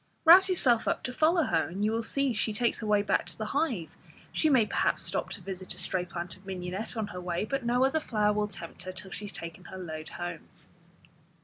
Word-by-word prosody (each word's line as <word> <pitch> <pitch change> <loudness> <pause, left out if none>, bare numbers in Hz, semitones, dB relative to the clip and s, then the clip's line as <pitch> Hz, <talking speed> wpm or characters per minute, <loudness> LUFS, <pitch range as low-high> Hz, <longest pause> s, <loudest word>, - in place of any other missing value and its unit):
Rouse 370 +4 +9
yourself 250 -11 +3
up - - 0
to 250 - -4
follow 325 +5 +4
her, 160 - +1
and 190 +6 -2
you 215 - +2
will 225 +1 0
see 275 +3 0
she 215 0 0
takes 235 +3 +1
her 220 - -4
way 210 -1 +3
back - - +1
to - - -10
the 215 - -3
hive. 250 - 0 0.4
She 315 - +2
may 255 -6 +5
perhaps - - +1
stop - - -1
to - - -7
visit 190 -1 -7
a - - -17
stray 180 -1 -1
plant 175 0 -5
of 190 - -20
mignonette 190 +4 -5
on 220 - 0
her 180 - -6
way, 175 +2 -1
but 275 +3 -2
no 245 +2 +3
other 270 +4 +2
flower 210 -7 +1
will 210 0 0
tempt 170 -5 -10
her 185 +1 -5
till 190 +1 -10
she 210 - -5
has 200 - -6
taken 170 +1 -7
her 190 - -8
load 160 -4 -6
home. 175 -2 -6
210 Hz, 240 wpm, -29 LUFS, 180-245 Hz, 0.4 s, Rouse